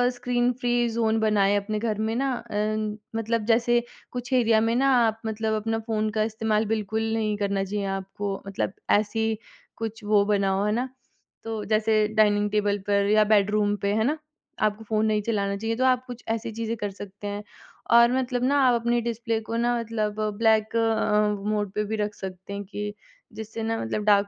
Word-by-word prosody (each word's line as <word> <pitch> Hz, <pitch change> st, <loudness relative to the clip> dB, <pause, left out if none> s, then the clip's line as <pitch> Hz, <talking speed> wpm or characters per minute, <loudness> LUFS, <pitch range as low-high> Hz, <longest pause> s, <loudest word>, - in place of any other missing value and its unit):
Screen 245 Hz, 0 st, +1 dB
free 240 Hz, -1 st, +1 dB
zone 225 Hz, -1 st, +1 dB
बनाएँ 205 Hz, -2 st, +3 dB
अपने 210 Hz, +1 st, -2 dB
घर 220 Hz, -2 st, -1 dB
में 225 Hz, -, -1 dB
ना 270 Hz, +1 st, 0 dB, 0.2 s
अम, 215 Hz, 0 st, -1 dB, 0.2 s
मतलब 225 Hz, -1 st, -1 dB
जैसे 240 Hz, +1 st, +3 dB, 0.3 s
कुछ 245 Hz, +1 st, -5 dB
एरिया 230 Hz, -3 st, +4 dB
में 230 Hz, +1 st, +1 dB
ना 270 Hz, +2 st, +3 dB, 0.2 s
आप 225 Hz, 0 st, -1 dB
मतलब 220 Hz, 0 st, -1 dB
अपना 225 Hz, +1 st, -1 dB
फ़ोन 215 Hz, -1 st, 0 dB
का 215 Hz, -, +3 dB
इस्तेमाल 220 Hz, 0 st, 0 dB
बिल्कुल 220 Hz, 0 st, -1 dB
नहीं 215 Hz, -2 st, 0 dB
करना 200 Hz, -1 st, 0 dB
चाहिए 200 Hz, +1 st, -3 dB
आपको, 195 Hz, +1 st, -4 dB
मतलब 195 Hz, 0 st, -2 dB, 0.3 s
ऐसी 220 Hz, +1 st, -1 dB, 0.4 s
कुछ 225 Hz, -1 st, -5 dB
वो 205 Hz, -1 st, +4 dB
बनाओ, 200 Hz, -1 st, +1 dB
है 210 Hz, -, +1 dB
ना? 250 Hz, +4 st, -1 dB, 0.5 s
तो 220 Hz, -2 st, -4 dB
जैसे 215 Hz, 0 st, +2 dB
डाइनिंग 210 Hz, -1 st, +3 dB
टेबल 205 Hz, -1 st, +1 dB
पर 200 Hz, 0 st, +3 dB
या 215 Hz, 0 st, +6 dB
बेडरूम 210 Hz, 0 st, +3 dB
पे। 200 Hz, +1 st, +2 dB
है 220 Hz, +1 st, +2 dB
ना? 300 Hz, +4 st, +1 dB, 0.5 s
आपको 215 Hz, +1 st, -1 dB
फ़ोन 215 Hz, 0 st, +1 dB
नहीं 210 Hz, -1 st, +1 dB
चलाना 200 Hz, -3 st, 0 dB
चाहिए 225 Hz, +2 st, -2 dB
तो 260 Hz, -, +2 dB
आप 255 Hz, 0 st, +2 dB
कुछ 245 Hz, -1 st, -8 dB
ऐसी 225 Hz, 0 st, -2 dB
चीज़ें 230 Hz, 0 st, -3 dB
कर 205 Hz, -1 st, -3 dB
सकते 200 Hz, +1 st, -9 dB
हैं, 205 Hz, +1 st, -4 dB, 0.5 s
और 235 Hz, +1 st, +7 dB
मतलब 250 Hz, -1 st, -1 dB
ना 280 Hz, +2 st, +3 dB
आप 240 Hz, -1 st, +4 dB
अपने 240 Hz, 0 st, +1 dB
डिस्प्ले 230 Hz, -1 st, -2 dB
को 225 Hz, +1 st, -5 dB
ना 240 Hz, 0 st, +1 dB
मतलब 215 Hz, -2 st, -2 dB, 0.2 s
ब्लैक 220 Hz, 0 st, +3 dB
अ, 210 Hz, -2 st, +1 dB
मोड 205 Hz, -2 st, -1 dB
पे 210 Hz, 0 st, 0 dB
भी 220 Hz, +2 st, -2 dB
रख 210 Hz, 0 st, -3 dB
सकते 190 Hz, +1 st, -7 dB
हैं 200 Hz, 0 st, -4 dB
कि 205 Hz, +1 st, -5 dB, 0.4 s
जिससे 220 Hz, +1 st, -6 dB
ना 225 Hz, 0 st, -1 dB
मतलब 160 Hz, -, -2 dB
डार्क 200 Hz, -1 st, +4 dB
215 Hz, 195 wpm, -25 LUFS, 205-230 Hz, 0.5 s, और